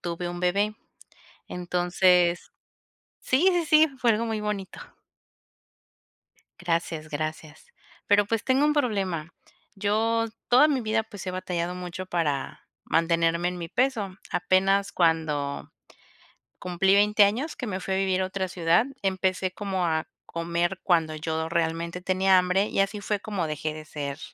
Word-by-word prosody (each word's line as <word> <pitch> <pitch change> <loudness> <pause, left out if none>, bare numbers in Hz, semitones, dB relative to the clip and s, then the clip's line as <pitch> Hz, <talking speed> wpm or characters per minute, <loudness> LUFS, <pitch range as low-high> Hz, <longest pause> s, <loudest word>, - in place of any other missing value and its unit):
tuve 175 0 -4
un 175 0 -6
bebé. 200 +4 +1 0.7
Entonces 180 0 +1 0.7
Sí, 285 +9 +2
sí, 350 -1 +1
sí, 310 0 +5
fue 240 -2 +3
algo 225 +2 +1
muy 220 -1 -2
bonito. 210 -2 -4 1.8
Gracias, 165 -2 -2
gracias. 155 0 -5 0.4
Pero, 205 0 +4
pues, 225 +1 -1
tengo 265 +2 +3
un 300 - +3
problema. 190 - -1 0.4
Yo, 220 +3 +1 0.2
toda 255 +5 +6
mi 275 -4 +1
vida, 225 -1 0
pues, 200 -3 -10
he - - -1
batallado 180 -1 -3
mucho 180 +1 -6
para, 150 -6 -2 0.2
mantenerme 165 +1 +1
en 180 0 -5
mi 170 - -6
peso. 225 -5 -1 0.2
Apenas 195 +2 +2
cuando, 160 -4 0 0.9
cumplí 180 +2 +1
20 210 +1 +5
años 240 +10 0
que 250 - -5
me 190 -2 -3
fui 190 +1 -3
a - - +1
vivir 190 -1 +1
a - - +1
otra 190 0 -3
ciudad, 170 +4 +2 0.2
empecé 190 -1 0
como 190 -2 -2
a 160 -1 -1 0.2
comer 170 +2 -2
cuando 165 -4 +2
yo 160 +1 -3
realmente 170 +1 -2
tenía 190 +1 +3
hambre. 180 +2 +2
Y - - -2
así 195 +2 -1
fue 205 +1 -1
como 195 -5 -3
dejé 155 0 -3
de 155 0 -9
ser 145 -2 -5
185 Hz, 150 wpm, -26 LUFS, 170-205 Hz, 1.8 s, toda